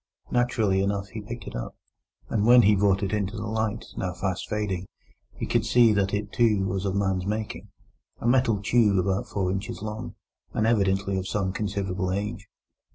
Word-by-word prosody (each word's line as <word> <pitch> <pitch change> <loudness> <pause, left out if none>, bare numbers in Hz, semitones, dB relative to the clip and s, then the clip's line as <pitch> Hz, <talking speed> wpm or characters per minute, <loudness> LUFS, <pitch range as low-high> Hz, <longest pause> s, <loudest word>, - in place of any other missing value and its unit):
Naturally 115 -6 +2
enough, 100 0 -1
he 110 - -6
picked 120 +3 -7
it - - -7
up, - - -5 0.5
and 105 -3 0
when 120 0 +8
he 105 +1 +5
brought 100 0 +2
it 100 - -1
into 105 0 -1
the 105 - -4
light, 110 0 -2
now 90 -3 -2
fast 95 -2 -3
fading, 95 -4 -2 0.5
he - - -4
could - - +1
see 120 -3 +5
that 100 -1 +1
it, 105 0 -3
too, 110 -5 +3
was 95 +1 -2
of 95 -1 -1
man's 95 -2 0
making—a 110 +2 -6
metal 120 -4 +3
tube 105 -3 +3
about 95 +1 0
four 95 -2 -1
inches 95 0 -4
long, 110 +2 -5 0.4
and 110 - +1
evidently 100 -3 +2
of 95 - -5
some 95 -2 -1
considerable 95 -2 -2
age. 105 +1 -3
100 Hz, 180 wpm, -26 LUFS, 95-110 Hz, 0.5 s, when